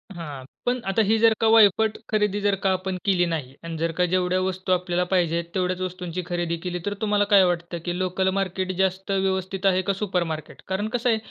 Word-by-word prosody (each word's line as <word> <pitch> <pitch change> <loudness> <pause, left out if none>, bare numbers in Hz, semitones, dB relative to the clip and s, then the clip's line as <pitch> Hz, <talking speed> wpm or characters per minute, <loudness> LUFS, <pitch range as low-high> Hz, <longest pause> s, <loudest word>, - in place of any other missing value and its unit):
हां, 145 -6 -7 0.2
पण 250 +1 +1
आता 195 +3 +2
ही 220 +1 +3
जर 225 0 +5
का 225 - +4
वायफट 220 -1 +5
खरेदी 210 -2 +1
जर 200 -1 +2
का 195 - +3
आपण 185 0 -3
केली 185 -3 +3
नाही 155 -6 -3
आणि 165 -1 -5
जर 165 +1 -1
का 180 - +4
जेवढ्या 185 0 +2
वस्तू 185 0 -2
आपल्याला 180 -1 +1
पाहिजेत 170 -2 +2
तेवढ्याच 185 0 0
वस्तूंची 180 -1 -4
खरेदी 175 -1 -2
केली, 180 -1 -3
तर 205 - -1
तुम्हाला 205 -1 +2
काय 195 -2 +8
वाटतं 175 -1 -2
की 175 0 -2
लोकल 185 +1 0
मार्केट 185 0 -2
जास्त 190 +1 0
व्यवस्थित 190 0 -1
आहे 185 -1 +4
का 195 +2 0
सुपरमार्केट? 180 -6 -3
कारण 190 +3 -1
कसं 245 0 +1
आहे 225 - +3
185 Hz, 205 wpm, -24 LUFS, 175-195 Hz, 0.2 s, काय